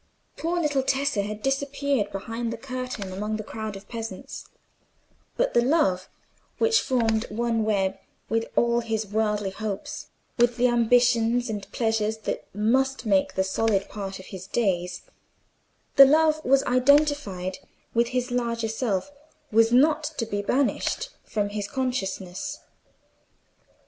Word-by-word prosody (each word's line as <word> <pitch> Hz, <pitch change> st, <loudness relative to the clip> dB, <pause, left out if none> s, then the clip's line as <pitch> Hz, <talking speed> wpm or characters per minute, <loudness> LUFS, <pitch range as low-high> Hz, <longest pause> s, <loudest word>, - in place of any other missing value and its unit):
Poor 345 Hz, +2 st, -1 dB
little 295 Hz, -4 st, +1 dB
Tessa 265 Hz, -5 st, +1 dB
had 210 Hz, +1 st, -5 dB
disappeared 275 Hz, -4 st, 0 dB
behind 225 Hz, +4 st, -4 dB
the 230 Hz, -, -4 dB
curtain 255 Hz, -6 st, -5 dB
among 210 Hz, +3 st, -2 dB
the 215 Hz, -, -5 dB
crowd 220 Hz, 0 st, -6 dB
of 195 Hz, +1 st, -11 dB
peasants; 230 Hz, +3 st, -7 dB, 0.9 s
but -, -, +1 dB
the 240 Hz, -, +5 dB
love 240 Hz, -, +2 dB, 0.5 s
which 455 Hz, 0 st, +3 dB
formed 225 Hz, -4 st, +1 dB
one 230 Hz, +1 st, 0 dB
web 195 Hz, -2 st, 0 dB, 0.3 s
with 225 Hz, 0 st, 0 dB
all 235 Hz, 0 st, +3 dB
his 225 Hz, -2 st, -2 dB
worldly 210 Hz, -1 st, 0 dB
hopes, 205 Hz, 0 st, -5 dB, 0.3 s
with 240 Hz, 0 st, +3 dB
the 250 Hz, +1 st, +4 dB
ambitions 240 Hz, 0 st, +3 dB
and 205 Hz, -2 st, -6 dB
pleasures 220 Hz, -1 st, 0 dB
that 220 Hz, -, -4 dB
must 260 Hz, +6 st, +1 dB
make 195 Hz, -3 st, +2 dB
the 190 Hz, -, +2 dB
solid 200 Hz, +1 st, 0 dB
part 195 Hz, -2 st, -5 dB
of 185 Hz, -, -11 dB
his 190 Hz, 0 st, -7 dB
days—the 180 Hz, -6 st, -1 dB, 1.0 s
love 310 Hz, +2 st, +4 dB
that -, -, -8 dB
was 270 Hz, +1 st, +5 dB
identified 255 Hz, -8 st, +2 dB, 0.3 s
with 235 Hz, 0 st, +3 dB
his 250 Hz, 0 st, -2 dB
larger 235 Hz, -2 st, -1 dB
self—was 225 Hz, +1 st, -1 dB
not 300 Hz, +5 st, +4 dB
to 230 Hz, -, -1 dB
be 205 Hz, -2 st, -2 dB
banished 275 Hz, -, 0 dB
from 205 Hz, -2 st, -2 dB
his 205 Hz, -1 st, -4 dB
consciousness. 250 Hz, +1 st, -3 dB
230 Hz, 135 wpm, -25 LUFS, 205-260 Hz, 1.0 s, the